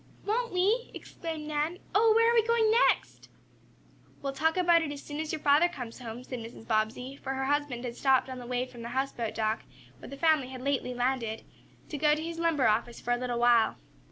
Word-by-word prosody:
"Won't 470 Hz, +3 st, 0 dB
we?" 405 Hz, +7 st, +1 dB
exclaimed 320 Hz, -3 st, -6 dB
Nan. 305 Hz, +3 st, -1 dB, 0.2 s
"Oh, 440 Hz, +2 st, +5 dB
where 460 Hz, +1 st, +5 dB
are -, -, +2 dB
we 465 Hz, -, +5 dB
going 455 Hz, -1 st, +3 dB, 0.2 s
next?" -, -, -3 dB, 0.9 s
"We'll 275 Hz, -1 st, -2 dB
talk 320 Hz, +5 st, +1 dB
about 345 Hz, -2 st, +5 dB
it 305 Hz, -3 st, -3 dB
as 285 Hz, -1 st, -7 dB
soon 290 Hz, 0 st, -6 dB
as 315 Hz, 0 st, -3 dB
your 310 Hz, -, -4 dB
father 295 Hz, +4 st, +5 dB
comes 250 Hz, -9 st, -8 dB
home," 240 Hz, 0 st, -7 dB
said 255 Hz, -1 st, -6 dB
Mrs. 225 Hz, 0 st, -10 dB
Bobbsey, 225 Hz, +4 st, -1 dB
for 270 Hz, -1 st, -5 dB
her 265 Hz, 0 st, -2 dB
husband 280 Hz, -3 st, -1 dB
had 235 Hz, -1 st, -5 dB
stopped 265 Hz, 0 st, +3 dB
on 260 Hz, -1 st, -6 dB
the 245 Hz, -, -9 dB
way 250 Hz, 0 st, -1 dB
from 245 Hz, -2 st, -12 dB
the 230 Hz, -, -6 dB
houseboat 255 Hz, -4 st, -2 dB
dock, 220 Hz, 0 st, 0 dB, 0.4 s
where -, -, -10 dB
the 275 Hz, -, -8 dB
family 310 Hz, -4 st, +3 dB
had 255 Hz, -1 st, -8 dB
lately 265 Hz, -2 st, -1 dB
landed, 245 Hz, -3 st, -1 dB, 0.5 s
to 295 Hz, -, -5 dB
go 300 Hz, 0 st, +4 dB
to 310 Hz, -, -5 dB
his 335 Hz, 0 st, -5 dB
lumber 325 Hz, -6 st, +2 dB
office 230 Hz, +2 st, 0 dB
for 245 Hz, -, -3 dB
a 245 Hz, -, +3 dB
little 245 Hz, -1 st, -2 dB
while. 240 Hz, -1 st, +4 dB
275 Hz, 220 wpm, -29 LUFS, 245-325 Hz, 0.9 s, Oh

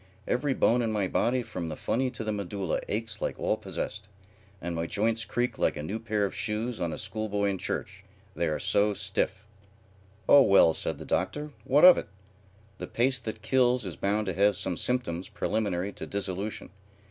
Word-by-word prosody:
Every 135 Hz, +2 st, +1 dB
bone 120 Hz, +2 st, +3 dB
in 115 Hz, -2 st, 0 dB
my 105 Hz, -3 st, 0 dB
body 125 Hz, +6 st, +1 dB
from 85 Hz, -7 st, -5 dB
the 80 Hz, -, -4 dB
funny 130 Hz, +9 st, 0 dB
to 120 Hz, -2 st, -6 dB
the 110 Hz, -, -1 dB
medulla 100 Hz, -3 st, -2 dB
aches 110 Hz, 0 st, -3 dB
like -, -, -2 dB
all -, -, +1 dB
possessed, 105 Hz, 0 st, -5 dB, 0.5 s
and 85 Hz, -1 st, -4 dB
my 85 Hz, 0 st, -2 dB
joints 110 Hz, +3 st, 0 dB
creak 120 Hz, +5 st, -1 dB
like -, -, +1 dB
a 75 Hz, -, -4 dB
new 100 Hz, +8 st, -3 dB
pair 105 Hz, -2 st, 0 dB
of 100 Hz, -, -4 dB
shoes 110 Hz, +2 st, -3 dB
on 85 Hz, -1 st, 0 dB
a -, -, -4 dB
school 110 Hz, +2 st, -4 dB
boy 100 Hz, 0 st, +1 dB
in 95 Hz, -, -4 dB
church, 95 Hz, +2 st, -4 dB, 0.3 s
they 85 Hz, -, 0 dB
are 75 Hz, -, 0 dB
so 105 Hz, 0 st, +2 dB
stiff." 95 Hz, +1 st, -2 dB, 0.8 s
"Oh 145 Hz, -, +9 dB
well," 100 Hz, -8 st, +6 dB
said -, -, -2 dB
the -, -, -9 dB
Doctor, 150 Hz, 0 st, -1 dB
"what 145 Hz, +6 st, +6 dB
of 180 Hz, -, +9 dB
it? -, -, -7 dB, 0.7 s
The 90 Hz, -, -5 dB
pace 125 Hz, +2 st, +1 dB
that 110 Hz, -2 st, -6 dB
kills 125 Hz, 0 st, +3 dB
is 90 Hz, -, -5 dB
bound 105 Hz, +2 st, 0 dB
to 95 Hz, -, -2 dB
have 100 Hz, +2 st, +3 dB
some 90 Hz, -, -2 dB
symptoms 95 Hz, -4 st, -2 dB
preliminary 100 Hz, -3 st, -1 dB
to -, -, -7 dB
dissolution. 100 Hz, +1 st, -4 dB
105 Hz, 195 wpm, -28 LUFS, 95-115 Hz, 0.8 s, Oh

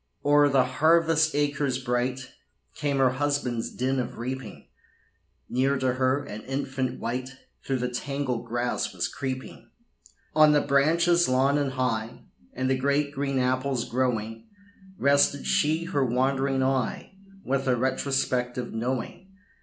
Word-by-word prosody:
O'er 145 Hz, 0 st, +5 dB
the 135 Hz, -2 st, +3 dB
harvest 160 Hz, +3 st, +3 dB
acres 145 Hz, -3 st, 0 dB
bright, 130 Hz, +1 st, -2 dB, 0.4 s
Came 140 Hz, -1 st, -1 dB
her 130 Hz, -2 st, +4 dB
husband's 130 Hz, -4 st, -1 dB
din 130 Hz, +1 st, -1 dB
of 125 Hz, -, -4 dB
reaping; 130 Hz, +3 st, -6 dB, 0.8 s
Near 135 Hz, +3 st, +1 dB
to 130 Hz, -1 st, 0 dB
her, 130 Hz, +2 st, +1 dB
an 110 Hz, -6 st, -8 dB
infant 130 Hz, -1 st, -3 dB
wight 130 Hz, +2 st, -4 dB, 0.3 s
Through 135 Hz, -, -1 dB
the 125 Hz, 0 st, -1 dB
tangled 130 Hz, -1 st, -3 dB
grass 120 Hz, -4 st, -2 dB
was 90 Hz, -1 st, -1 dB
creeping. 130 Hz, +5 st, -6 dB, 0.7 s
On 155 Hz, -1 st, +6 dB
the 145 Hz, -, +4 dB
branches 170 Hz, +4 st, +3 dB
long 135 Hz, +3 st, +3 dB
and 140 Hz, -2 st, -1 dB
high, 115 Hz, -4 st, -2 dB, 0.3 s
And 130 Hz, +1 st, -2 dB
the 135 Hz, -, +2 dB
great 140 Hz, +2 st, +1 dB
green 140 Hz, -1 st, -2 dB
apples 130 Hz, 0 st, 0 dB
growing, 120 Hz, -, -2 dB, 0.5 s
Rested 140 Hz, 0 st, +3 dB
she 160 Hz, +3 st, +1 dB
her 170 Hz, -5 st, 0 dB
wandering 135 Hz, +2 st, +1 dB
eye, 130 Hz, -, -1 dB, 0.3 s
With 135 Hz, 0 st, -1 dB
a 125 Hz, -, +3 dB
retrospective 125 Hz, -1 st, -1 dB
knowing. 125 Hz, +10 st, -3 dB
130 Hz, 135 wpm, -26 LUFS, 125-140 Hz, 0.8 s, On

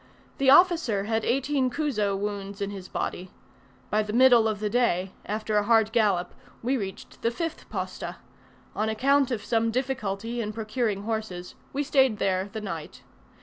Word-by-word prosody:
The 270 Hz, -1 st, +4 dB
officer 320 Hz, -, +5 dB
had 220 Hz, +1 st, -1 dB
eighteen 270 Hz, +1 st, +1 dB
chuzo 245 Hz, -9 st, 0 dB
wounds 200 Hz, 0 st, -4 dB
in 200 Hz, 0 st, -2 dB
his 190 Hz, -2 st, -8 dB
body. 180 Hz, +1 st, -4 dB, 0.6 s
By 215 Hz, -, +3 dB
the 210 Hz, 0 st, -4 dB
middle 240 Hz, -2 st, +6 dB
of 215 Hz, -2 st, -2 dB
the 210 Hz, -, -1 dB
day, 205 Hz, -5 st, +1 dB, 0.2 s
after 215 Hz, 0 st, -1 dB
a 205 Hz, -, +3 dB
hard 225 Hz, -1 st, +4 dB
gallop, 205 Hz, -6 st, +1 dB, 0.3 s
we 255 Hz, +3 st, +1 dB
reached 195 Hz, -6 st, -6 dB
the 230 Hz, -, +2 dB
fifth 330 Hz, +7 st, -5 dB
posta: -, -, -4 dB, 0.6 s
on 215 Hz, +1 st, 0 dB
account 270 Hz, +5 st, +3 dB
of 220 Hz, -5 st, -3 dB
some 230 Hz, -1 st, +1 dB
difficulty 235 Hz, -2 st, -2 dB
in 215 Hz, -1 st, -4 dB
procuring 215 Hz, -2 st, -2 dB
horses 215 Hz, -5 st, -4 dB, 0.2 s
we 285 Hz, +2 st, -1 dB
stayed 265 Hz, -5 st, +3 dB
there 190 Hz, 0 st, 0 dB
the 220 Hz, -, -5 dB
night. 165 Hz, -7 st, -7 dB
220 Hz, 165 wpm, -26 LUFS, 205-250 Hz, 0.6 s, middle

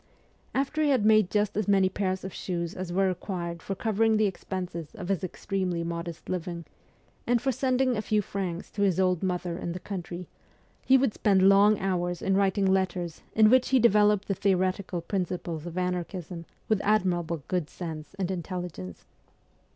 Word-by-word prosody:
After 280 Hz, +3 st, 0 dB
he 300 Hz, -, +3 dB
had 255 Hz, -7 st, +3 dB
made 215 Hz, -3 st, +5 dB
just 210 Hz, 0 st, 0 dB
as 215 Hz, 0 st, -1 dB
many 195 Hz, -2 st, +4 dB
pairs 185 Hz, 0 st, -2 dB
of 190 Hz, -, -6 dB
shoes 170 Hz, -2 st, -3 dB
as 185 Hz, -1 st, -5 dB
were 190 Hz, +2 st, +2 dB
required 175 Hz, -2 st, -4 dB
for 195 Hz, -, -4 dB
covering 220 Hz, +2 st, +2 dB
the 215 Hz, -, +3 dB
expenses 180 Hz, -4 st, -5 dB
of 180 Hz, -, -7 dB
his 195 Hz, -1 st, 0 dB
extremely 185 Hz, -1 st, -2 dB
modest 170 Hz, 0 st, -5 dB
living, 175 Hz, -2 st, -4 dB, 0.6 s
and 245 Hz, 0 st, +3 dB
for 265 Hz, -, 0 dB
sending 255 Hz, 0 st, +1 dB
a 210 Hz, -, -1 dB
few 215 Hz, 0 st, +1 dB
francs 185 Hz, -3 st, -4 dB
to 205 Hz, -, -4 dB
his 190 Hz, -3 st, +2 dB
old 185 Hz, -2 st, +2 dB
mother 180 Hz, -2 st, -2 dB
in 170 Hz, -, -3 dB
the 180 Hz, -, -5 dB
country, 180 Hz, -2 st, -6 dB, 0.6 s
he 265 Hz, -, +6 dB
would 260 Hz, -5 st, +1 dB
spend 190 Hz, -2 st, +3 dB
long 200 Hz, +2 st, +6 dB
hours 175 Hz, -2 st, -1 dB
in 195 Hz, -, +2 dB
writing 195 Hz, 0 st, +2 dB
letters 185 Hz, -3 st, 0 dB
in 215 Hz, 0 st, +6 dB
which 255 Hz, 0 st, +4 dB
he 265 Hz, -, +4 dB
developed 210 Hz, -3 st, +4 dB
the 195 Hz, -, +1 dB
theoretical 185 Hz, -2 st, 0 dB
principles 175 Hz, -3 st, -3 dB
of 175 Hz, +1 st, -7 dB
anarchism 180 Hz, -1 st, -3 dB, 0.2 s
with 215 Hz, -3 st, +2 dB
admirable 175 Hz, -6 st, +1 dB
good 180 Hz, -5 st, -1 dB
sense 160 Hz, 0 st, -7 dB
and 190 Hz, -1 st, -1 dB
intelligence. 175 Hz, -, -6 dB
190 Hz, 175 wpm, -27 LUFS, 175-205 Hz, 0.6 s, he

